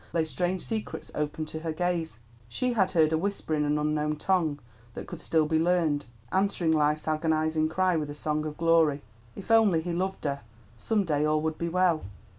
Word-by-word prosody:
—lay 165 -2 +1
strange 180 +3 -2
secrets 220 -1 -4
open 150 +1 -2
to 160 +1 -6
her 160 0 -3
gaze. 170 -4 -2 0.3
She 250 - -1
had 195 -5 +2
heard 160 -2 +4
a 160 - +2
whisper 200 -3 -2
in 150 -1 +1
an 150 0 +1
unknown 150 0 0
tongue 160 -2 0 0.4
that - - -6
could 170 -2 -8
still 160 -1 +2
be 160 +1 +1
learned, 165 -4 +1 0.3
answering 190 -3 +1
Life's 150 0 +1
agonizing 155 0 +1
cry 185 +2 +1
with 150 -2 -2
a 145 - -6
song 150 0 -1
of 150 - -7
glory. 160 -4 +3 0.3
If 200 - -6
only 215 -7 +5
he 170 +2 -3
loved 190 +2 -2
her, 140 -1 -2 0.3
some 205 - 0
day 150 -4 0
all 155 0 +2
would 160 0 -2
be 170 - -1
well. 180 -2 +2
160 Hz, 200 wpm, -28 LUFS, 150-180 Hz, 0.4 s, only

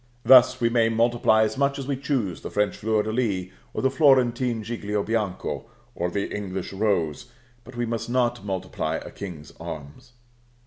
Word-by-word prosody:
Thus 130 +1 +7
we 115 - +2
may 115 -1 +3
multiply 115 -1 +3
as 110 +5 -2
much 140 0 +2
as 135 - -5
we 140 0 -1
choose 125 - -2
the - - -6
French 105 -2 0
fleur 110 0 +1
de 110 - -3
lis, 100 -6 -1 0.2
or - - -4
the 130 - +3
Florentine 125 -5 +3
giglio 105 -3 -2
bianco, 105 -2 -2 0.3
or 90 - -2
the 100 +3 -3
English 95 -2 -5
rose; 95 -4 0 0.4
but 125 +2 -13
we 120 0 -1
must 115 0 -3
not 120 -3 +1
multiply 95 -5 -3
a - - -6
King's 85 -6 -8
arms. 80 - -9
110 Hz, 175 wpm, -25 LUFS, 95-120 Hz, 0.4 s, Thus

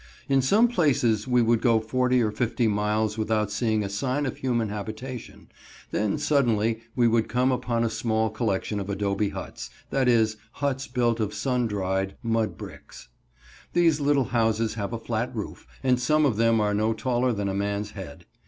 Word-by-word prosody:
In 135 -1 +3
some 205 - +4
places 130 - +1
we 125 -1 +3
would 115 0 +2
go 115 -3 +4
forty 125 +2 +1
or 105 - 0
fifty 120 +1 0
miles 105 +1 0
without 110 -1 0
seeing 110 -3 0
a - - -2
sign 130 +8 -1
of 130 - -3
human 120 -4 0
habitation, 110 +4 -7 0.4
then 105 -1 0
suddenly 115 -7 +1 0.2
we 120 -2 +4
would 115 -1 +2
come 125 +2 +2
upon 120 -2 0
a 115 - +1
small 110 -1 0
collection 105 -2 -1
of 100 0 -5
adobe 100 0 0
huts, - - -7 0.2
that 135 -2 +1
is, 110 -3 +3 0.2
huts 140 -1 -2
built 120 -2 0
of 105 -2 -2
sun 125 -3 0
dried, 95 -2 -2
mud 115 -1 0
bricks. - - -11 0.6
These 165 -3 +3
little 140 -2 +2
houses 115 -1 +1
have 100 -2 -4
a 115 - -2
flat 115 +2 -3
roof, 105 - -6 0.2
and 125 -1 +3
some 150 +5 +3
of 120 -7 +1
them 115 0 +3
are 105 -1 +1
no 110 +2 +1
taller 125 +2 0
than 100 -3 -2
a 95 - -1
man's 100 +1 -2
head. 90 -9 -9
115 Hz, 180 wpm, -26 LUFS, 105-125 Hz, 0.6 s, some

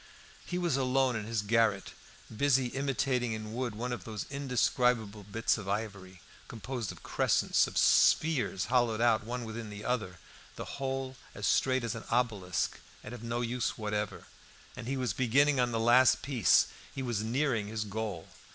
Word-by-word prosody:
He 180 - -2
was 175 -6 +1
alone 130 -1 +2
in 110 -2 -3
his 110 -2 -2
garret, 110 -2 +1 0.4
busy 135 0 +2
imitating 135 -3 -1
in 110 0 -6
wood 120 -2 -3
one 120 +3 -3
of 120 - -6
those 110 -2 -5
indescribable 125 -5 0
bits 110 +3 0
of 100 -2 -7
ivory, 100 -3 -4 0.3
composed 115 0 -5
of - - -13
crescents, - - +2
of - - -6
spheres 145 - +3
hollowed 120 -2 +2
out 115 -2 +3
one 120 +2 -4
within 110 0 -6
the 105 0 -8
other, 105 -8 -2 0.4
the - - -7
whole 135 -1 -3 0.2
as - - -4
straight 130 -2 +2
as 115 -1 -2
an 115 - -7
obelisk, 105 -7 0 0.2
and 105 - -8
of 120 - -8
no 120 +1 -2
use 120 +1 -2
whatever; 105 -2 -3 0.5
and 115 - -7
he 135 +1 -1
was 125 -7 -1
beginning 135 +4 +3
on 120 -1 +2
the 115 - -1
last 120 +3 +5
piece 130 -7 +4 0.3
he 135 - -3
was 120 -4 -1
nearing 115 -1 0
his 110 0 -3
goal. 105 -5 -5
115 Hz, 170 wpm, -31 LUFS, 110-130 Hz, 0.5 s, last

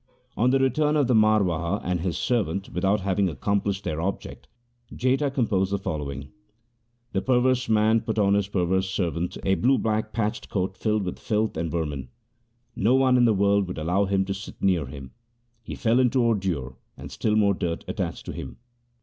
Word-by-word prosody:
On 120 +3 +2
the 135 - +3
return 150 +3 +2
of 145 - +3
the 125 - +1
Marwaha 100 -5 +2
and 90 -2 -1
his 90 -1 -2
servant 100 -6 -1
without 95 +3 0
having 95 0 +1
accomplished 100 +6 -1
their 80 +1 -3
object, 95 +3 -5 0.4
Jetha 135 +3 0
com 130 -3 +1
posed 95 -3 0
the 100 - +1
following: 70 -6 -5 0.4
— 120 0 -46
The 95 - 0
perverse 130 0 +2
man 110 +1 +3
put 110 -1 -3
on 100 -2 +3
his 100 -1 +1
perverse 95 -1 0
servant 90 -2 -2
a 95 - +2
blue 130 +7 +3
black 110 -1 -1
patched 110 -2 -2
coat 95 -1 -2
filled 105 +1 0
with 90 - -5
filth 110 0 -1
and 80 0 -2
veimin. 75 -4 -2
1 65 - -8 0.7
No 115 +6 +3
one 130 -1 +4
in 125 -1 +5
the 110 -3 +3
world 100 0 +2
would 90 - -6
allow 90 +6 +1
him 95 0 +1
to 95 - -2
sit 95 +1 -9
near 90 -7 +1
him; 65 -1 -9 0.5
he - - -7
fell 115 +1 +2
into 130 0 +2
ordure 90 - -1 0.2
and - - -9
still 105 -1 0
more 100 -2 +4
dirt 85 -3 -3
attached - - -4
to - - -5
him. 65 - -8
100 Hz, 195 wpm, -25 LUFS, 90-115 Hz, 0.7 s, in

